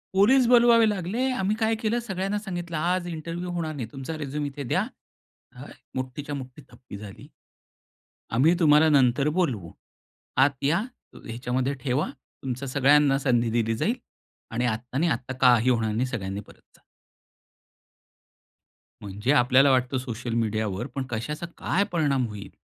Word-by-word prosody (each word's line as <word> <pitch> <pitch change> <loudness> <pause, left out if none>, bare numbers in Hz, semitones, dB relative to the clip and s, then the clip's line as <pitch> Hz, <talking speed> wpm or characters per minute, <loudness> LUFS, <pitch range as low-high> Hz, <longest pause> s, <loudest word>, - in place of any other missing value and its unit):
Police 245 +7 +5
बोलवावे 235 -1 +6
लागले. 210 +6 -1
आम्ही 205 -3 0
काय 225 0 +2
केलं, 230 +2 0
सगळ्यांना 195 -2 -3
सांगितलं, 175 -5 -5
"आज 175 +3 0
इंटरव्ह्यू 170 +2 -5
होणार 165 -3 -3
नाही, 120 -6 -4
तुमचा 140 +4 -6
रिझ्युम 145 0 -3
इथे 140 0 -5
द्या." 120 - 0 1.1
मोठीच्या 130 +3 -4
मोठी 130 +1 -8
थप्पी 120 -3 -11
झाली. 100 -1 -11 1.1
"आम्ही 150 +9 +4
तुम्हाला 155 -1 +6
नंतर 140 -1 +3
बोलवू. 110 - -1 0.7
आत 140 0 -2
या, 155 +5 +3 0.4
अ, - - -11
ह्याच्यामध्ये 125 +3 -2
ठेवा, 130 +4 0 0.3
तुमच्या 130 +1 -4
सगळ्यांना 140 +1 +4
संधी 120 -4 +1
दिली 115 -1 0
जाईल 225 - 0 0.6
आणि 115 +2 -1
आत्ता 120 +3 -3
नाही, 165 +2 +2
आत्ता 130 0 -5
काही 125 -1 +5
होणार 115 -3 +1
नाही, 120 +4 0
सगळ्यांनी 100 -5 -4
परत - - -18
जा." - - -29 2.2
म्हणजे 105 +6 -2
आपल्याला 130 +1 +5
वाटतं 130 0 +1
सोशल 120 -2 -5
मीडियावर, 110 -1 -1
पण 135 - -1
कशाचा 150 +9 -3
काय 195 - +1
परिणाम 145 -7 +1
होईल? 105 -2 -8
135 Hz, 145 wpm, -25 LUFS, 120-170 Hz, 2.2 s, बोलवावे